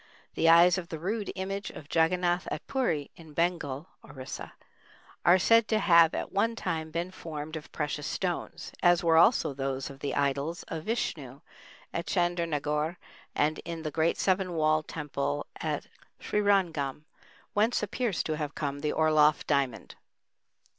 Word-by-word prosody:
The 165 Hz, -, +3 dB
eyes 175 Hz, +2 st, +7 dB
of 170 Hz, -2 st, -9 dB
the 160 Hz, -, -4 dB
rude 205 Hz, +6 st, -3 dB
image 195 Hz, +1 st, -4 dB
of 145 Hz, -, -10 dB
Jagganath 175 Hz, +3 st, +1 dB
at 150 Hz, -, -5 dB
Puri, 170 Hz, -, -1 dB
in 160 Hz, -3 st, -13 dB
Bengal 165 Hz, -3 st, -1 dB, 0.2 s
(Orissa), 130 Hz, -1 st, -8 dB, 0.7 s
are 175 Hz, +2 st, +6 dB
said 230 Hz, +4 st, +4 dB
to 220 Hz, -, +2 dB
have 170 Hz, -5 st, +5 dB
at -, -, -4 dB
one 225 Hz, +4 st, +1 dB
time 160 Hz, -6 st, -3 dB
been 170 Hz, +3 st, -3 dB
formed 155 Hz, -3 st, -7 dB
of 155 Hz, -2 st, -8 dB
precious 150 Hz, -1 st, -3 dB
stones, 180 Hz, -3 st, -3 dB
as 175 Hz, -1 st, +4 dB
were 165 Hz, -1 st, +4 dB
also 170 Hz, -, +4 dB
those 135 Hz, 0 st, -3 dB
of 135 Hz, -, -13 dB
the 140 Hz, -, -3 dB
idols 140 Hz, +4 st, -1 dB
of 160 Hz, -1 st, -5 dB
Vishnu 145 Hz, -, -3 dB, 0.5 s
at 170 Hz, -, -3 dB
Chandernagore 165 Hz, -3 st, 0 dB, 0.4 s
and 155 Hz, +1 st, +1 dB
in 165 Hz, -1 st, -6 dB
the 155 Hz, -, -3 dB
great 160 Hz, +2 st, +1 dB
seven 185 Hz, -1 st, +1 dB
walled 155 Hz, -1 st, +2 dB
temple 140 Hz, -, -3 dB
at -, -, -3 dB, 0.3 s
Srirangam, 175 Hz, -9 st, +1 dB, 0.5 s
whence 215 Hz, +2 st, +2 dB
appears 210 Hz, -1 st, -1 dB
to 155 Hz, -1 st, -2 dB
have 150 Hz, -2 st, -4 dB
come 140 Hz, -1 st, -3 dB
the 150 Hz, +1 st, -1 dB
Orloff 155 Hz, -1 st, +3 dB
diamond. 140 Hz, -4 st, -1 dB
165 Hz, 155 wpm, -29 LUFS, 150-180 Hz, 0.7 s, eyes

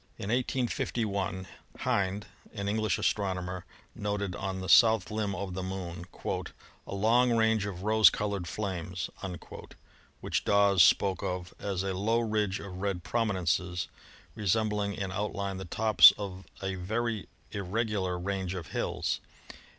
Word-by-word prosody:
In 100 Hz, -, -5 dB
185 120 Hz, -1 st, 0 dB
1 95 Hz, -2 st, -3 dB, 0.3 s
Hind, 100 Hz, +1 st, 0 dB, 0.3 s
an 100 Hz, -1 st, -3 dB
English 110 Hz, -1 st, +1 dB
astronomer, 90 Hz, -3 st, -1 dB, 0.3 s
noted 100 Hz, -3 st, -2 dB
on 95 Hz, -1 st, -3 dB
the 95 Hz, -, -5 dB
south 110 Hz, -2 st, +6 dB
limb 105 Hz, -2 st, -1 dB
of 95 Hz, -1 st, -4 dB
the 95 Hz, -, -3 dB
Moon 90 Hz, -2 st, -5 dB, 0.8 s
"a -, -, -4 dB
long 120 Hz, +4 st, +4 dB
range 110 Hz, -2 st, +2 dB
of 95 Hz, -2 st, -6 dB
rose 110 Hz, +1 st, +7 dB
colored 100 Hz, -4 st, -3 dB
flames," 90 Hz, -3 st, -4 dB, 1.1 s
which -, -, -1 dB
Dawes 100 Hz, -2 st, +4 dB
spoke 95 Hz, +4 st, +4 dB
of 90 Hz, -3 st, -4 dB
as 95 Hz, -2 st, -2 dB
a 95 Hz, -1 st, -1 dB
low 110 Hz, +5 st, +1 dB
ridge 105 Hz, -4 st, 0 dB
of 95 Hz, -2 st, -8 dB
red 100 Hz, -3 st, -2 dB
prominences 90 Hz, -6 st, 0 dB, 0.4 s
resembling 105 Hz, -1 st, 0 dB
in 95 Hz, -1 st, -3 dB
outline 100 Hz, -1 st, -2 dB
the 95 Hz, -, -6 dB
tops 110 Hz, +5 st, +7 dB
of 95 Hz, -2 st, -6 dB, 0.2 s
a 95 Hz, 0 st, -1 dB
very 110 Hz, +4 st, -2 dB, 0.2 s
irregular 100 Hz, -2 st, -1 dB
range 95 Hz, 0 st, -2 dB
of 85 Hz, -4 st, -6 dB
hills. -, -, -1 dB
100 Hz, 135 wpm, -30 LUFS, 95-105 Hz, 1.1 s, rose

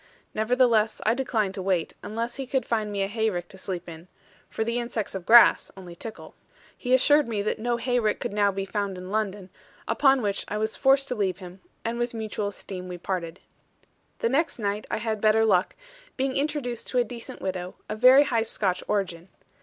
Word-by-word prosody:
Nevertheless, 225 Hz, -1 st, +2 dB
I 220 Hz, -, +4 dB
declined 225 Hz, -6 st, -1 dB
to 190 Hz, -, -5 dB
wait, 185 Hz, -3 st, 0 dB
unless 230 Hz, +4 st, -4 dB
he 270 Hz, -1 st, -5 dB
could 260 Hz, -2 st, 0 dB
find 215 Hz, -3 st, -1 dB
me 200 Hz, -1 st, -1 dB
a -, -, 0 dB
hayrick 205 Hz, -5 st, -1 dB
to 190 Hz, -, -12 dB
sleep 180 Hz, -2 st, -4 dB
in; 165 Hz, +1 st, -10 dB, 0.4 s
for 220 Hz, -, -2 dB
the 235 Hz, +2 st, -1 dB
insects 235 Hz, -3 st, -3 dB
of 190 Hz, -3 st, -6 dB
grass 235 Hz, +1 st, +7 dB
only 180 Hz, -2 st, -10 dB
tickle. 220 Hz, +5 st, -9 dB, 0.4 s
He 250 Hz, 0 st, +2 dB
assured 290 Hz, +2 st, +4 dB
me 210 Hz, -3 st, -2 dB
that 215 Hz, -, -1 dB
no 240 Hz, +1 st, 0 dB
hayrick 240 Hz, -3 st, 0 dB
could -, -, -4 dB
now 205 Hz, -1 st, +3 dB
be 195 Hz, 0 st, -3 dB
found 200 Hz, -1 st, -3 dB
in 185 Hz, +1 st, -8 dB
London; 205 Hz, -3 st, -2 dB, 0.4 s
upon 270 Hz, -3 st, +3 dB
which 200 Hz, -1 st, -1 dB
I 210 Hz, -, -3 dB
was 220 Hz, +1 st, -1 dB
forced 275 Hz, 0 st, +3 dB
to -, -, 0 dB
leave 195 Hz, -6 st, -1 dB
him, 185 Hz, 0 st, -11 dB, 0.2 s
and 230 Hz, +1 st, -2 dB
with 240 Hz, -1 st, -2 dB
mutual 215 Hz, -2 st, -3 dB
esteem 190 Hz, -2 st, -7 dB
we 180 Hz, -1 st, -6 dB
parted. 175 Hz, -2 st, -4 dB, 0.8 s
The 230 Hz, -, 0 dB
next 305 Hz, +6 st, +1 dB
night 205 Hz, -1 st, -2 dB
I -, -, -1 dB
had 220 Hz, -1 st, -2 dB
better 220 Hz, +1 st, +4 dB
luck, 185 Hz, -4 st, +2 dB, 0.4 s
being 265 Hz, 0 st, 0 dB
introduced 280 Hz, -5 st, -2 dB
to 255 Hz, -, -2 dB
a 245 Hz, -, +5 dB
decent 235 Hz, 0 st, -8 dB
widow, 185 Hz, -1 st, -4 dB
of 215 Hz, -, -5 dB
very 255 Hz, +4 st, +8 dB
high 235 Hz, -5 st, +1 dB
Scotch 200 Hz, -4 st, -1 dB
origin. 185 Hz, -4 st, -2 dB
215 Hz, 200 wpm, -26 LUFS, 195-240 Hz, 0.8 s, very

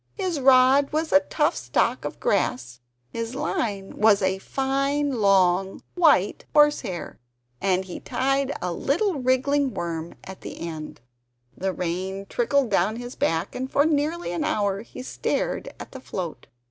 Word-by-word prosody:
His 370 Hz, -6 st, -2 dB
rod 265 Hz, +1 st, +5 dB
was 315 Hz, +1 st, -1 dB
a 285 Hz, -, +7 dB
tough 300 Hz, +1 st, 0 dB
stalk 125 Hz, -1 st, 0 dB
of -, -, -5 dB
grass, 125 Hz, -1 st, -1 dB, 0.3 s
his 230 Hz, +2 st, -4 dB
line 200 Hz, -7 st, -2 dB
was 210 Hz, -2 st, +4 dB
a 190 Hz, 0 st, +1 dB
fine 275 Hz, +2 st, -1 dB
long 190 Hz, -1 st, +3 dB
white 310 Hz, -, +3 dB
horse 295 Hz, 0 st, +5 dB
hair, 185 Hz, -8 st, -6 dB, 0.4 s
and 190 Hz, -1 st, +1 dB
he 180 Hz, -, -7 dB
tied 275 Hz, +1 st, 0 dB
a 180 Hz, -1 st, -1 dB
little 335 Hz, -, 0 dB
wriggling 265 Hz, +2 st, +1 dB
worm 165 Hz, -1 st, -4 dB
at 190 Hz, 0 st, -10 dB
the -, -, -8 dB
end. 155 Hz, -6 st, -7 dB, 0.5 s
The 190 Hz, +1 st, -2 dB
rain 185 Hz, +2 st, -3 dB
trickled 245 Hz, +3 st, +1 dB
down 195 Hz, +3 st, +2 dB
his 245 Hz, +1 st, -7 dB
back, 165 Hz, +3 st, -1 dB
and 260 Hz, +1 st, -4 dB
for 285 Hz, -, +3 dB
nearly 315 Hz, -, 0 dB
an 175 Hz, -, -2 dB
hour 200 Hz, -1 st, 0 dB
he 235 Hz, -, -10 dB
stared -, -, -2 dB
at -, -, -9 dB
the 265 Hz, -, -9 dB
float. 180 Hz, -9 st, -6 dB
230 Hz, 155 wpm, -24 LUFS, 185-280 Hz, 0.5 s, a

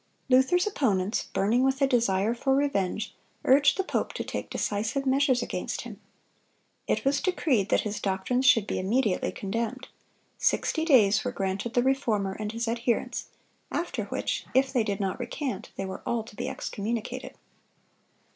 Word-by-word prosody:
Luther's 265 Hz, +8 st, +4 dB
opponents, 210 Hz, -, 0 dB
burning 225 Hz, +6 st, +2 dB
with 265 Hz, 0 st, +2 dB
a 275 Hz, -, +4 dB
desire 230 Hz, -5 st, +2 dB
for 265 Hz, +3 st, +1 dB
revenge, 215 Hz, -7 st, 0 dB, 0.3 s
urged 280 Hz, +4 st, +5 dB
the 385 Hz, -, +1 dB
pope -, -, -2 dB
to -, -, -3 dB
take -, -, -5 dB
decisive 220 Hz, +7 st, -1 dB
measures 265 Hz, -2 st, +3 dB
against -, -, -3 dB
him. -, -, -10 dB, 0.9 s
It -, -, 0 dB
was 275 Hz, +1 st, +2 dB
decreed 270 Hz, -, +1 dB
that -, -, +3 dB
his 210 Hz, -1 st, -3 dB
doctrines 200 Hz, +7 st, 0 dB
should 235 Hz, -7 st, +6 dB
be -, -, -2 dB
immediately 205 Hz, +1 st, +1 dB
condemned. 230 Hz, +6 st, -4 dB, 0.5 s
Sixty 320 Hz, 0 st, +1 dB
days 215 Hz, -, +5 dB
were 250 Hz, -, -2 dB
granted 195 Hz, +2 st, -3 dB
the 245 Hz, -, +4 dB
Reformer 230 Hz, -8 st, +1 dB
and 210 Hz, -1 st, -3 dB
his 230 Hz, +1 st, -3 dB
adherents, 235 Hz, +1 st, -1 dB, 0.4 s
after 345 Hz, -, -2 dB
which, -, -, -3 dB
if 265 Hz, 0 st, +3 dB
they 245 Hz, -4 st, +3 dB
did 200 Hz, -1 st, -2 dB
not 195 Hz, +2 st, -2 dB
recant, 255 Hz, +3 st, -4 dB
they 195 Hz, -, -3 dB
were 190 Hz, 0 st, -6 dB
all 235 Hz, -2 st, -1 dB
to 220 Hz, -1 st, -14 dB
be 255 Hz, -, -3 dB
excommunicated. 230 Hz, -3 st, -4 dB
235 Hz, 160 wpm, -27 LUFS, 205-265 Hz, 0.9 s, should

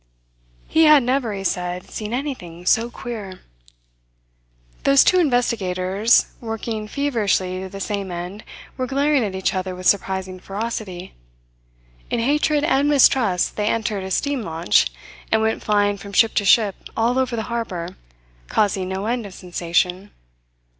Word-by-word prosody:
He 320 Hz, 0 st, +4 dB
had 305 Hz, -3 st, +7 dB
never, 250 Hz, -2 st, 0 dB
he 195 Hz, -1 st, -5 dB
said, 180 Hz, -1 st, -3 dB
seen 215 Hz, 0 st, -5 dB
anything 235 Hz, -, -5 dB
so 230 Hz, +5 st, +3 dB
queer. 215 Hz, -7 st, -7 dB, 1.4 s
Those 275 Hz, 0 st, +6 dB
two 370 Hz, -, +4 dB
investigators 220 Hz, -, +2 dB, 0.2 s
working 225 Hz, -1 st, -4 dB
feverishly 210 Hz, -9 st, 0 dB
to 190 Hz, -, -6 dB
the 195 Hz, +1 st, -8 dB
same 200 Hz, -1 st, -3 dB
end 180 Hz, +4 st, -6 dB, 0.3 s
were 255 Hz, -1 st, -2 dB
glaring 280 Hz, 0 st, +2 dB
at 195 Hz, -3 st, -3 dB
each 190 Hz, -, 0 dB
other 185 Hz, -1 st, -3 dB
with 185 Hz, 0 st, -9 dB
surprising 190 Hz, -1 st, 0 dB
ferocity. 195 Hz, -2 st, -5 dB, 1.0 s
In -, -, -1 dB
hatred 295 Hz, +4 st, +1 dB
and 290 Hz, -2 st, +2 dB
mistrust 250 Hz, -10 st, +3 dB
they 210 Hz, 0 st, 0 dB
entered 215 Hz, -3 st, -1 dB
a 190 Hz, -, -5 dB
steam 280 Hz, +7 st, -1 dB
launch, 165 Hz, -, +2 dB, 0.4 s
and 220 Hz, -, +4 dB
went 220 Hz, 0 st, 0 dB
flying 205 Hz, -1 st, +1 dB
from 200 Hz, -1 st, -10 dB
ship 225 Hz, +3 st, +4 dB
to 205 Hz, -, 0 dB
ship 205 Hz, -1 st, +4 dB, 0.2 s
all 235 Hz, +3 st, +2 dB
over 255 Hz, -2 st, 0 dB
the 220 Hz, -, -2 dB
harbour, 185 Hz, -7 st, -4 dB, 0.5 s
causing 190 Hz, -, 0 dB
no 190 Hz, +2 st, -3 dB
end 235 Hz, -1 st, -2 dB
of 185 Hz, -, -12 dB
sensation. 180 Hz, +2 st, -1 dB
210 Hz, 145 wpm, -21 LUFS, 185-245 Hz, 1.4 s, had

